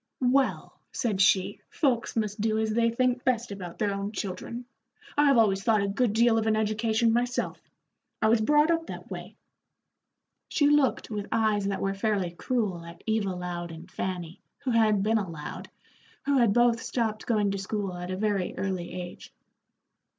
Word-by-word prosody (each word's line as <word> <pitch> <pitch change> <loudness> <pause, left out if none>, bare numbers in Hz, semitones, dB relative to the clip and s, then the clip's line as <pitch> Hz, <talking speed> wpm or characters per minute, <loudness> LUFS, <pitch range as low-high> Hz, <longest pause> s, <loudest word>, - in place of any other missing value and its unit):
"Well," 275 -1 0
said 210 -6 -1
she, 195 0 +3
"folks 255 -7 0
must 215 -2 -1
do 220 0 +1
as 220 0 0
they 230 +1 +3
think 250 +1 0
best 240 -3 0
about 180 -4 -7
their 205 -2 0
own 200 +1 -3
children. 210 +4 -5 0.5
I 290 - +4
have 275 -3 +5
always 195 -4 +3
thought 215 -2 +3
a - - 0
good 210 +2 +1
deal 230 0 +4
of 220 - -1
an 220 - +3
education 220 +1 +1
myself. 245 +1 -1 0.6
I - - +3
was 220 0 +4
brought 295 +7 +4
up 330 0 0
that - - -8
way." - - -7 1.1
She 290 - +2
looked 290 -5 +3
with 210 -1 -3
eyes 215 -3 +2
that 200 -1 -2
were 195 0 0
fairly 195 -3 0
cruel 195 -2 -2
at 170 0 -12
Eva 220 -3 0
Loud 175 -1 -4
and 165 +2 -11
Fanny, 180 -2 -4 0.2
who 260 - 0
had 215 -3 +3
been 220 +1 +2
a 195 -4 -4
Loud, 150 -3 -7 0.6
who 280 -1 +3
had 235 -4 +4
both 240 +1 +3
stopped 220 -3 -2
going 210 -4 +2
to 195 - -3
school 195 -1 -3
at 180 0 -6
a 185 - -3
very 200 -3 -1
early 185 -2 -3
age. 175 -1 -8
215 Hz, 180 wpm, -27 LUFS, 195-235 Hz, 1.1 s, have